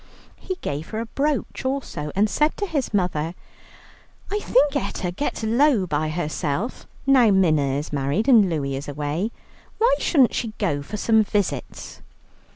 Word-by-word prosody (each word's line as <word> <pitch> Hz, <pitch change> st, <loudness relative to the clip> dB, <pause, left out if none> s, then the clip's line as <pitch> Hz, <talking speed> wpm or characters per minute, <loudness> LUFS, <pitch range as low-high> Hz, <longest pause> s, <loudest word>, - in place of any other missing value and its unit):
He 375 Hz, -, -4 dB
gave 145 Hz, +3 st, -4 dB
her 220 Hz, -, -4 dB
a 230 Hz, -, -3 dB
brooch 280 Hz, +5 st, -2 dB
also, 260 Hz, -, -3 dB
and 205 Hz, +2 st, +3 dB
said 300 Hz, +8 st, +1 dB
to 410 Hz, -, -1 dB
his 305 Hz, -8 st, -2 dB
mother, 180 Hz, -4 st, -1 dB, 1.0 s
"I 415 Hz, -, 0 dB
think 295 Hz, -, +2 dB
Etta 195 Hz, -9 st, -2 dB
gets 230 Hz, +4 st, -3 dB
low 235 Hz, -1 st, +3 dB
by 155 Hz, -2 st, -1 dB
herself, 155 Hz, -, -3 dB, 0.2 s
now 260 Hz, -4 st, +5 dB
Minna 155 Hz, -8 st, +3 dB
is 150 Hz, +1 st, -5 dB
married 145 Hz, -, 0 dB
and 225 Hz, -8 st, +6 dB
Louie 140 Hz, -5 st, -2 dB
is 140 Hz, +2 st, -6 dB
away. 150 Hz, +8 st, -2 dB, 0.5 s
Why 475 Hz, +3 st, +4 dB
shouldn't 270 Hz, -8 st, +3 dB
she 225 Hz, -3 st, -2 dB
go 155 Hz, -9 st, 0 dB
for 205 Hz, +9 st, -6 dB
some 220 Hz, +1 st, +3 dB
visits?" 195 Hz, -10 st, -3 dB
200 Hz, 160 wpm, -23 LUFS, -, 1.0 s, and